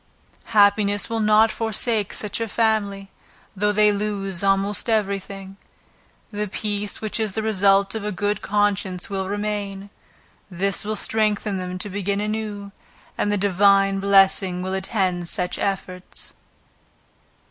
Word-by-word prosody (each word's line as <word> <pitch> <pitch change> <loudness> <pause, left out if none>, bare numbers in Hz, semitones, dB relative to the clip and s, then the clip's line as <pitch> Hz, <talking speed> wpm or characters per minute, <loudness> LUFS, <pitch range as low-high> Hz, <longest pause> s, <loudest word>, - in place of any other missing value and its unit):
Happiness 205 0 +3
will 225 - 0
not 215 +1 +4
forsake 220 -1 -1
such 210 +2 -4
a 225 - -1
family 200 -3 0 0.4
though 210 +2 +1
they 210 0 +4
lose 200 -2 -3
almost 195 +3 +1
every 200 -3 +1
thing, 195 0 -10 0.7
the 210 0 -3
peace 205 0 -3
which 215 +1 -2
is 215 -3 -1
the 220 - -2
result 200 -2 +3
of 220 -2 -4
a 210 - -2
good 205 +2 -1
conscience 200 -3 0
will 190 -1 -2
remain; 205 -1 -3 0.6
this 195 +1 -1
will 215 +1 -2
strengthen 210 -2 0
them 185 0 -4
to 185 - -4
begin 200 0 -2
anew, 210 -1 -4 0.4
and 205 - 0
the 205 - +1
Divine 195 0 +3
blessing 195 -2 +3
will 190 0 -3
attend 185 -3 -1
such 180 -4 -2
efforts. 185 -2 -4
200 Hz, 135 wpm, -23 LUFS, 195-210 Hz, 0.7 s, not